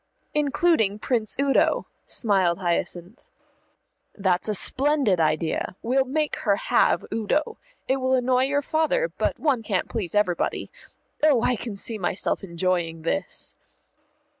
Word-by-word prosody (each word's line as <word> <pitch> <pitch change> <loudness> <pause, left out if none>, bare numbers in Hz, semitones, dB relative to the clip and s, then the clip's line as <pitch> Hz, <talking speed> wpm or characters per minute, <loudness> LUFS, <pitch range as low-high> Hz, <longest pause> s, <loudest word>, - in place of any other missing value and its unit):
"Including 290 - +2
Prince 220 -1 -1
Udo," 275 -1 +2 0.2
smiled 190 -6 +2
Hyacinth. 175 +3 -3 0.9
"That's 190 0 0
a 210 - +1
splendid 270 - +2
idea. 160 +3 -1
We'll 265 +3 +2
make 300 +3 -1
her 205 -4 +1
have - - +2
Udo. 290 - -1 0.3
It 265 - +2
will 260 0 +1
annoy 255 0 +2
your 285 +1 0
father, 320 - +1
but - - -1
one 275 -7 +1
can't 205 -4 -2
please 210 -4 -4
everybody. 195 -5 0 0.5
Oh, 290 -6 +4
I 250 - +2
can 225 -2 -6
see 215 +2 -1
myself 190 +2 -2
enjoying 170 -2 -2
this." 185 +3 0
225 Hz, 130 wpm, -24 LUFS, 185-275 Hz, 0.9 s, Oh